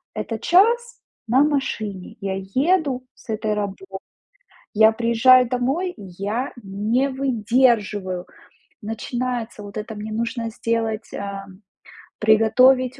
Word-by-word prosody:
Это 225 -1 -4
час 465 - +3 0.3
на 255 +5 +4
машине 220 -10 -2
я 195 -1 -2
еду 260 - 0
с - - -21
этой 215 -1 -1
работы. 200 -2 -4 0.9
Я 220 0 +6
приезжаю 235 +2 +5
домой, 270 +10 -1
и 215 - -13 0.2
я 220 +7 -2
не 215 +7 0
выдерживаю, 225 -7 +1 0.6
начинается: 235 +1 -4
"Вот 205 +1 -9
это 215 +1 -5
мне 210 +1 -6
нужно 230 +1 -2
сделать, 225 -1 -2
а, 200 -1 -5
м, 190 +2 -16 0.6
приготовить 250 +4 +4
230 Hz, 115 wpm, -22 LUFS, 210-255 Hz, 0.9 s, Я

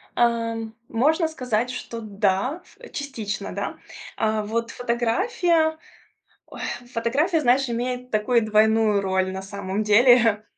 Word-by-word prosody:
Эм, 230 -1 0 0.2
можно 315 +8 +2
сказать, 250 -6 -2
что 230 -2 -6
да. 205 - -1 0.2
Э, 485 - -12
частично 220 -9 -5
да. - - -4 0.4
А, 215 -1 0
вот 230 +2 -2
фотография, 315 - +1 0.7
ой, - - -11 0.3
фотография, 295 +9 +1
знаешь, 260 0 +3
имеет 250 +1 -3
такую 225 +2 +2
двойную 215 -1 +3
роль 190 -1 0
на 190 0 -5
самом 195 +1 -4
деле. 225 0 +5
230 Hz, 120 wpm, -24 LUFS, 215-255 Hz, 0.7 s, деле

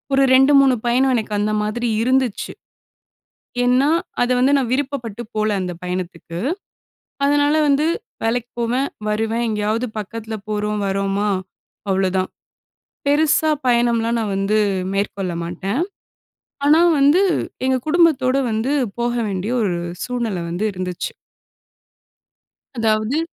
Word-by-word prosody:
ஒரு 275 - +4
2 270 +2 +6
3 265 -2 +4
பயணம் 260 +2 +3
எனக்கு 220 -2 -2
அந்த 210 +1 0
மாதிரி 235 +3 -1
இருந்துச்சு. 255 -3 0 1.1
ஏன்னா 255 +4 +3 0.3
அத 245 - +1
வந்து 270 +3 +4
நான் 255 -4 -1
விருப்பப்பட்டு 255 -5 -2
போல 215 0 +1
அந்த 180 -1 -3
பயணத்துக்கு. 180 -2 -5 0.9
அதனால 290 +1 +3
வந்து 285 +2 +3 0.4
வேலைக்கு 240 +1 -1
போவேன் 250 +4 0 0.2
வருவேன். 225 +2 0
எங்கேயாவது 215 +3 -1
பக்கத்தில 225 +2 -6 0.2
போறோம் 210 0 -1
வர்றோமா 195 +1 0 0.6
அவ்வளவுதான். 190 -1 +1 0.8
பெருசா 310 +2 +3 0.2
பயணம்லாம் 235 -1 +2
நான் 210 -3 -2
வந்து 195 +2 +1 0.4
மேற்கொள்ள 195 -2 -2
மாட்டேன். 190 - -3 0.9
ஆனா, 305 +3 +6 0.2
வந்து 285 +6 +5 0.4
எங்க 260 0 +2
குடும்பத்தோட 305 -6 +3
வந்து 220 +4 -1 0.3
போக 240 0 0
வேண்டிய 195 +3 -2
ஒரு 190 -4 0 0.3
சூழ்நில 235 -6 -2
வந்து 175 +5 -2
இருந்துச்சு. 180 -1 -4 1.6
அதாவது. 220 +3 +1
230 Hz, 115 wpm, -20 LUFS, 205-260 Hz, 1.6 s, 2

